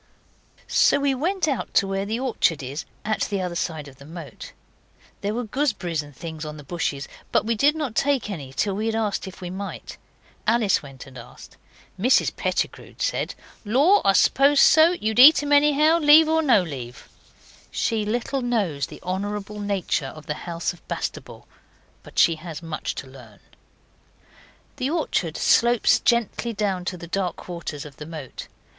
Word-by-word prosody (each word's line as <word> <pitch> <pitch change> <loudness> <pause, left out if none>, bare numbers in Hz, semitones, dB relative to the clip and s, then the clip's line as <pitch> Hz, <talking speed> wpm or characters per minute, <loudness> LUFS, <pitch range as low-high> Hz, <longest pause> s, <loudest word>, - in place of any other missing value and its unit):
So - - +4
we 280 -1 +1
went 345 +6 -1
out 275 -4 -3
to - - +4
where 195 +1 -2
the 225 +3 -2
orchard 220 - 0
is, 135 +4 -5 0.2
at 215 0 -1
the 200 -2 -1
other 180 -2 -3
side 160 -3 -3
of 135 -1 -14
the 140 - -14
moat. 160 -6 -9 0.7
There 205 +2 -2
were 245 - -2
gooseberries 215 - -1
and 145 -2 -14
things 160 +1 -7
on 150 0 -7
the 150 - -10
bushes, 145 -2 -3 0.2
but - - +2
we 230 - +1
did 285 +7 +3
not 295 -7 -3
take 275 0 +1
any 150 -10 -6
till 195 +8 -1
we 215 +3 -2
had 225 - -1
asked 215 -3 -1
if 190 0 -11
we 180 -1 -5
might. 195 +2 -7 0.5
Alice 225 -2 +3
went 135 -2 -11
and 135 -2 -12
asked. 120 - -13 0.4
Mrs 250 +7 +3
Pettigrew - - -3
said, - - -2 0.3
'Law! 285 - +4
I 195 - +4
suppose 275 +8 +4
so; 320 +2 +6
you'd 220 -8 -1
eat 295 +3 +9
'em 290 - -3
anyhow, 300 +3 +4
leave 310 +1 +7
or 320 0 +2
no 250 -11 +4
leave.' 125 -7 -8 0.6
She 225 -2 -1
little 240 +5 -2
knows 200 - -1
the - - -12
honourable 205 +3 -4
nature 200 -3 -1
of 155 -1 -11
the 150 - -2 0.2
house 170 0 -2
of 175 - -18
Bastable. - - -6 0.5
But - - -16
she 165 -1 +4
has 165 0 -8
much 165 -2 -4
to 130 - -7
learn. 125 -6 -15 1.4
The 260 - -1
orchard 290 - -1
slopes 240 -1 +4
gently 235 0 0
down 195 -4 -2
to 180 - -3
the 170 - -9
dark 180 +1 -3
waters 165 -4 -6
of 145 -2 -12
the 150 - -8
moat. 155 -6 -8
200 Hz, 175 wpm, -23 LUFS, 160-250 Hz, 1.4 s, eat